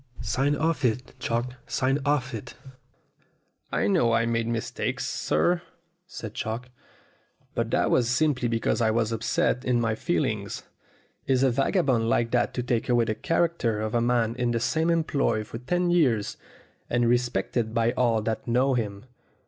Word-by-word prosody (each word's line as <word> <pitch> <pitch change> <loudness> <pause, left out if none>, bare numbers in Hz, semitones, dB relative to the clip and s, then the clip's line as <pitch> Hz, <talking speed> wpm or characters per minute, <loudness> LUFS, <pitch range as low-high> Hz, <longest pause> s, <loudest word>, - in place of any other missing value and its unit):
Sign 135 +6 0
off 160 0 0
it, 125 +1 0
Chalk 120 0 -2
sign 135 +2 +1
off 135 -3 +1
it 110 - -7 0.6
!" - - -42
"I - - +1
know 115 +3 +3
I 115 0 +3
made 115 0 0
mistakes, 115 -1 -2
sir," 175 - +1 0.5
said 110 - -7
Chalk, 115 +4 -4 0.8
"but - - -1
that - - +1
was 120 -2 +3
simply 130 -1 +1
because 115 +1 0
I 110 - +3
was 115 0 +1
upset 115 +2 0
in 125 -2 +1
my 115 -2 +1
feelings. 110 - -2 0.6
Is 130 -1 +3
a 135 - +4
vagabond 130 - +1
like 115 0 +1
that 125 - +2
to 125 - -1
take 120 0 -1
away 120 -1 +3
the 110 - 0
character 165 -4 0
of 110 0 -3
a 120 - +2
man 120 -1 +1
in 120 -1 +1
the 120 -1 0
same 160 +7 +1
employ 140 -9 +1
for 115 +2 -8
ten 175 +7 0
years, 125 -12 +2 0.5
and 120 0 +2
respected 120 -1 0
by 115 0 +3
all 115 -4 +1
that 110 +2 -3
know 130 +3 +2
him 105 -3 -3
120 Hz, 165 wpm, -26 LUFS, 115-130 Hz, 0.8 s, a